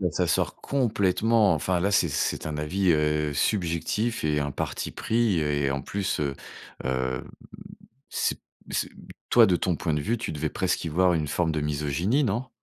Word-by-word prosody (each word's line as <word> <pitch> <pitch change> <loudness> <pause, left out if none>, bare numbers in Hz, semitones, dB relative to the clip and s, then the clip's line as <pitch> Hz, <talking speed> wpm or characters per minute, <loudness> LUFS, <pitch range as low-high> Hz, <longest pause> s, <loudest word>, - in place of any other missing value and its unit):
là, 90 - +1
ça - - +1
sort - - +1
complètement, 110 -4 +2
enfin 85 +3 0
là 100 +3 +1
c'est 95 -4 +3
c'est 75 - -1
un 75 -1 -3
avis, 90 +5 +1
heu, 75 -1 +1
subjectif 100 +7 0
et 75 -1 +2
un 70 -1 -1
parti - - -4
pris 110 -6 +1
et, 75 -2 0
en 70 0 -3
plus, 100 +4 -2
heu, 70 -2 -1 0.5
hem, 65 0 -2 0.8
c'est - - -1 0.3
c'est, - - -1 0.4
toi, - - +7
de 90 -2 +3
ton 90 -1 0
point 80 -1 -1
de 75 - 0
vue, 115 +11 0
tu 115 - -4
devais 75 0 -2
presque - - -1
y 80 - -2
voir 90 +3 +3
une 80 -2 0
forme 80 +3 0
de 80 -1 -1
misogynie, 75 - 0
non? 125 +2 -1
85 Hz, 185 wpm, -26 LUFS, 75-100 Hz, 0.8 s, toi